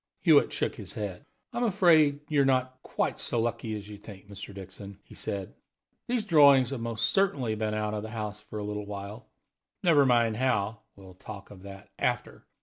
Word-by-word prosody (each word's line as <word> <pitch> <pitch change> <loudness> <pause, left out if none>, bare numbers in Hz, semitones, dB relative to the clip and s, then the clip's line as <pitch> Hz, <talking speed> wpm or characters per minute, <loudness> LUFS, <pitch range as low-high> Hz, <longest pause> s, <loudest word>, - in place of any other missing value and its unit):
Hewitt - - +5
shook - - -1
his - - -9
head. - - -5 0.3
"I'm 240 +1 -1
afraid 160 -8 +4
you're 145 -2 +3
not 130 -1 +1
quite - - -2
so 120 - 0
lucky 115 -1 -2
as 105 -1 -7
you 105 -1 -10
think, 100 -2 -12
Mr. 100 0 -8
Dixon," 100 0 -10
he - - -16
said. 100 -2 -5 0.5
"These 240 -3 -1
drawings 140 - +6
have 135 -4 -4
most 115 0 0
certainly 140 - +1
been 110 0 -2
out 105 0 -1
of 105 - -2
the 110 - -7
house 105 -2 -5
for 110 - -6
a 105 - -3
little 105 0 -4
while. 105 +3 -7 0.6
Never 160 -6 +5
mind 115 -3 +3
how 115 -4 0 0.2
we'll 95 -2 -13
talk 100 +2 -10
of 95 -2 -12
that 95 0 -11
after. - - -2
110 Hz, 190 wpm, -28 LUFS, 100-135 Hz, 0.6 s, drawings